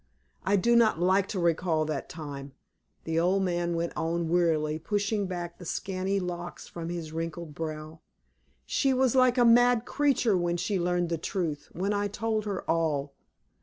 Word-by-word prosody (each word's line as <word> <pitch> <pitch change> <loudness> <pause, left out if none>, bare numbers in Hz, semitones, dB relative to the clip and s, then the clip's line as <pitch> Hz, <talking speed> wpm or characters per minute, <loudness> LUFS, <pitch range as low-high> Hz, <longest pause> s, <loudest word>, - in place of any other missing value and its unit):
I 200 - +2
do 235 +5 +3
not 225 -7 +4
like 190 +2 +3
to 200 - -4
recall 170 -2 +1
that 150 -3 -4
time," 140 -3 -7 0.5
the 165 0 0
old 185 +3 +2
man 175 -2 0
went 170 0 -2
on, 165 0 -1
wearily, 160 -3 +1
pushing 205 +3 -1
back 175 -2 -5
the - - -9
scanty 190 +3 -2
locks 175 -1 -6
from 170 -1 -6
his 170 -3 -5
wrinkled 165 -1 -5
brow. 155 0 -6 0.7
"She 270 -2 +1
was 255 -2 +3
like 255 -1 +4
a 245 - +5
mad 245 0 +5
creature 270 -8 +2
when 175 -1 0
she 185 +2 -1
learned 175 0 0
the 165 -2 -1
truth, 160 -5 -3
when 195 +4 -1
I 205 0 0
told 215 +1 -2
her 200 -3 -4
all. 150 -4 0
175 Hz, 170 wpm, -28 LUFS, 165-205 Hz, 0.7 s, a